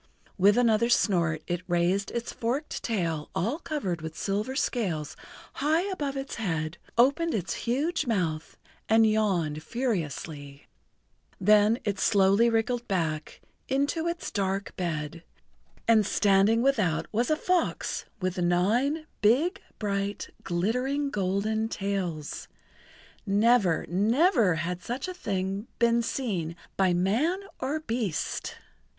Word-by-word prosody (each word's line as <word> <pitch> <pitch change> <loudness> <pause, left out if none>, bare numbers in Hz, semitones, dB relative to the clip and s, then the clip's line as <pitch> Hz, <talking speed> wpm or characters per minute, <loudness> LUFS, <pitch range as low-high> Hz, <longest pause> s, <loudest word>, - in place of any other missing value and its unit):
With 205 +3 +4
another 235 -1 +3
snort 170 -9 +2
it 175 0 -2
raised 175 +3 +1
its 235 0 -4
forked 255 +7 -2
tail 165 -9 -2
all 230 - -1
covered 195 - -3
with 160 0 -7
silver 210 +7 -2
scales 185 - -1 0.4
high 315 +5 +1
above 285 -6 -3
its 270 0 -5
head, 165 -7 -2 0.2
opened 285 +7 +3
its 175 -5 -2 0.2
huge 300 +6 0
mouth 165 -8 -1 0.3
and 225 0 +6
yawned 190 -9 +1
furiously. 155 - -4 0.7
Then 210 +3 +5
it 200 -2 -2
slowly 200 +3 +4
wriggled 235 +1 0
back 160 -5 -2 0.3
into 285 +5 0
its 340 -1 -3
dark 195 -1 -2
bed, 165 -2 -3 0.6
and 225 -2 +5
standing 205 +3 +3
without 210 - +2
was 235 +3 0
a 310 - +4
fox 360 +2 -1
with 185 -1 -2
nine 220 - +1 0.2
big, 285 - +3 0.2
bright, 200 -1 -2
glittering, 250 +11 0
golden 210 +2 0
tails. 190 -8 -3 0.8
Never, 205 -3 +3
never 225 - +3
had 175 +2 -3
such 255 +7 -4
a 370 - -4
thing 195 - -3
been 235 0 +3
seen 200 -9 -2 0.2
by 190 -2 +3
man 225 - +1 0.2
or 290 +4 -2
beast! 225 - -2
210 Hz, 120 wpm, -27 LUFS, 180-245 Hz, 0.8 s, and